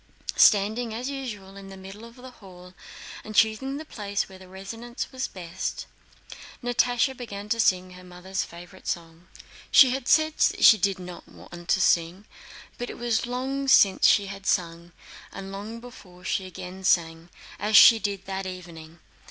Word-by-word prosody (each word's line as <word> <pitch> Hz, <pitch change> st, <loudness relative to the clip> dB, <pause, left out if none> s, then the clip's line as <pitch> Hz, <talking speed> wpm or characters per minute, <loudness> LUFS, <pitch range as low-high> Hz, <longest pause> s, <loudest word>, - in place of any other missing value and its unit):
Standing 220 Hz, +3 st, +3 dB
as 250 Hz, +4 st, -4 dB
usual 210 Hz, -8 st, -7 dB
in 195 Hz, 0 st, -11 dB
the 195 Hz, 0 st, -11 dB
middle 195 Hz, +4 st, -11 dB
of 235 Hz, 0 st, -14 dB
the 255 Hz, 0 st, -12 dB
hall 180 Hz, -5 st, -15 dB, 0.5 s
and 215 Hz, -1 st, -9 dB
choosing 220 Hz, +6 st, +2 dB
the 310 Hz, -, -8 dB
place 200 Hz, -7 st, -3 dB
where 190 Hz, -1 st, -14 dB
the 190 Hz, -, -14 dB
resonance 225 Hz, +8 st, -7 dB
was 260 Hz, 0 st, -3 dB
best, 175 Hz, -1 st, -6 dB, 0.8 s
Natásha 245 Hz, +2 st, +1 dB
began 205 Hz, -5 st, -8 dB
to 230 Hz, +1 st, 0 dB
sing 185 Hz, -4 st, +2 dB
her 180 Hz, 0 st, -13 dB
mother's 180 Hz, +2 st, -5 dB
favorite 175 Hz, +2 st, -11 dB
song. 165 Hz, 0 st, -5 dB, 0.4 s
She 265 Hz, -5 st, +7 dB
had 260 Hz, -1 st, -4 dB
said 315 Hz, 0 st, +4 dB
she 215 Hz, -, +5 dB
did 195 Hz, 0 st, +1 dB
not 180 Hz, -1 st, -10 dB
want 175 Hz, 0 st, -13 dB
to -, -, +3 dB
sing, 175 Hz, +2 st, +1 dB, 0.5 s
but 245 Hz, -, -4 dB
it -, -, -8 dB
was 235 Hz, -1 st, -1 dB
long 265 Hz, +3 st, -3 dB
since 200 Hz, -7 st, +5 dB
she 200 Hz, -, +4 dB
had 195 Hz, 0 st, -8 dB
sung, 170 Hz, -1 st, -1 dB, 0.4 s
and 195 Hz, 0 st, -8 dB
long 210 Hz, +4 st, -7 dB
before 185 Hz, -7 st, -14 dB
she 190 Hz, 0 st, -2 dB
again 185 Hz, +1 st, -9 dB
sang, 165 Hz, -2 st, +1 dB, 0.3 s
as 210 Hz, +1 st, +4 dB
she 230 Hz, -2 st, +9 dB
did 200 Hz, -2 st, -4 dB
that 190 Hz, 0 st, -4 dB
evening. 170 Hz, -3 st, -10 dB
195 Hz, 170 wpm, -25 LUFS, 180-235 Hz, 0.8 s, she